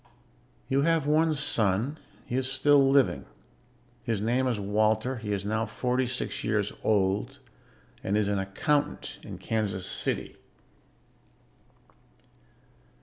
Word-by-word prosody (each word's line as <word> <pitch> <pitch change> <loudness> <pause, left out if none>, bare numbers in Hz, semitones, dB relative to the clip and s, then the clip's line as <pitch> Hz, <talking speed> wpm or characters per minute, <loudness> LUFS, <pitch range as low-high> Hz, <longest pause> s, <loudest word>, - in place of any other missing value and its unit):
You 135 +1 +2
have 165 -1 +2
one 155 +1 +3
son. 120 +1 0 0.3
He 120 - -4
is 130 0 0
still 145 +2 +4
living; 135 -1 +3 0.8
his 115 -3 -1
name 120 +5 +1
is 120 -4 0
Walter; 110 +5 +1
he 105 -2 -5
is 100 -1 -2
now 110 +2 -1
forty 125 0 -1
six 125 +1 -4
years - - 0
old 105 +5 +1 0.7
and 100 +2 +1
is 105 -1 +1
an 100 -1 0
accountant 95 +10 -1
in - - -8
Kansas 100 -4 -2
City." - - -3
115 Hz, 120 wpm, -28 LUFS, 105-135 Hz, 0.8 s, still